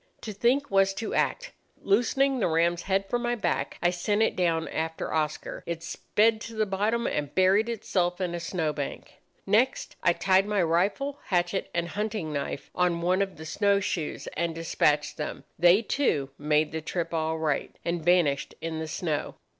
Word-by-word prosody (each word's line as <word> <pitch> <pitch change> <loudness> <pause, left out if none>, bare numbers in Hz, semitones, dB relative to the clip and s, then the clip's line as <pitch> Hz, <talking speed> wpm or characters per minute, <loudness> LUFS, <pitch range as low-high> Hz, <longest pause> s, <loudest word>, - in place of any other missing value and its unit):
To 215 - -6
think 250 +7 +1
was 195 0 +3
to 220 - -4
act. - - 0 0.3
Loosening 255 +6 +2
the - - +2
ram's 170 +1 +2
head 195 +1 0
from 240 +4 -1
my 240 0 0
back, 220 - -2
I 175 - +4
sent 205 +5 +1
it - - +1
down 165 -3 +1
after 160 0 -3
Oscar. 155 -1 -2
It 170 -1 -4
sped 215 +5 +1
to 230 0 -7
the 215 0 +1
bottom 210 +4 0
and 145 -1 -2
buried 195 +5 +4
itself 180 -5 -1
in 180 -2 -2
a 175 - -3
snow 165 -3 -2
bank. 145 -2 -6 0.3
Next 230 +7 +1
I 170 - +4
tied 190 +2 +3
my 205 -3 +2
rifle, 200 - 0
hatchet, 175 +1 0
and 170 0 0
hunting 210 -7 -3
knife 140 -1 -4
on 175 -2 +1
one 185 +2 +2
of 195 -1 -2
the 160 - -9
snow 200 +4 +2
shoes, 175 -5 -3
and 170 -1 -1
despatched 150 -2 +1
them. 150 - -5 0.2
They, 175 +6 +6
too, 150 - 0
made 150 +1 +2
the 160 +1 -3
trip 170 +1 -3
all 160 0 0
right, 155 -3 -1
and 170 -1 -1
vanished 165 -5 +2
in 165 -1 -4
the 160 - -4
snow. 155 -2 -3
180 Hz, 185 wpm, -27 LUFS, 160-210 Hz, 0.3 s, They